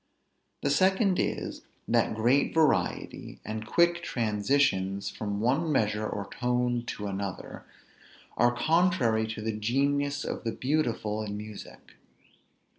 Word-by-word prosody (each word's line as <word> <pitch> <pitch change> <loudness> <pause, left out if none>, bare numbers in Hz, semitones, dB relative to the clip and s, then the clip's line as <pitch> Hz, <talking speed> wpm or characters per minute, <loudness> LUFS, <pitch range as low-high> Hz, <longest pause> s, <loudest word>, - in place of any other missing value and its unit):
The - - +2
second 190 +4 +3
is; - - -2 0.3
that - - +2
great 125 +8 +2
variety, 160 -2 0
and 110 0 -5
quick 170 +4 +3
transitions 105 - 0
from 105 -2 -4
one 140 +8 +1
measure 110 -5 +1
or 100 -1 -4
tone 125 +1 0
to 105 - -5
another, 100 -1 -5 0.7
are 120 +1 +4
contrary 155 -7 +2
to 110 -1 -5
the 110 -1 -2
genius 140 +6 0
of - - -4
the 115 -2 -2
beautiful 120 -7 -1
in 105 -1 -4
music. 105 0 -10
120 Hz, 120 wpm, -28 LUFS, 105-145 Hz, 0.7 s, are